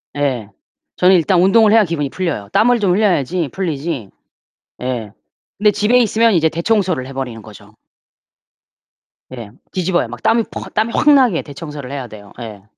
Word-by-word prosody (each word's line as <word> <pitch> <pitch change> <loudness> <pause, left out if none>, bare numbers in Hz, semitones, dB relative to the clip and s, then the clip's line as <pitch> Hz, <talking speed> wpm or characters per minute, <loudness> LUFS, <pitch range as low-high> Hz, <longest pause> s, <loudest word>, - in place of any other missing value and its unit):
예. 130 -7 -2 0.5
저는 185 +1 +4
일단 175 +1 +3
운동을 210 +3 +5
해야 225 0 +6
기분이 160 -6 -2
풀려요. 160 - -4
땀을 235 +4 +3
좀 200 -4 +1
흘려야지 180 - 0
풀리지 155 - -4 0.7
예. 125 -5 -4 0.5
근데 210 +1 +3
집에 210 +4 +2
있으면 230 -1 +3
이제 160 -3 +3
대청소를 170 - -1
해 135 - -9
버리는 125 -4 -5
거죠. 105 -1 -15 1.6
예. 115 -4 -9 0.2
뒤집어요. 180 -5 0
막 120 +1 -10
땀이 230 +1 +3
퍽 - - -8
땀이 220 +2 0
확 300 - +3
나게 250 -11 +3
대청소를 145 -2 -9
해야 135 -3 -5
돼요. 105 -3 -13
예. 110 -4 -9
165 Hz, 325 characters per minute, -17 LUFS, 130-205 Hz, 1.6 s, 해야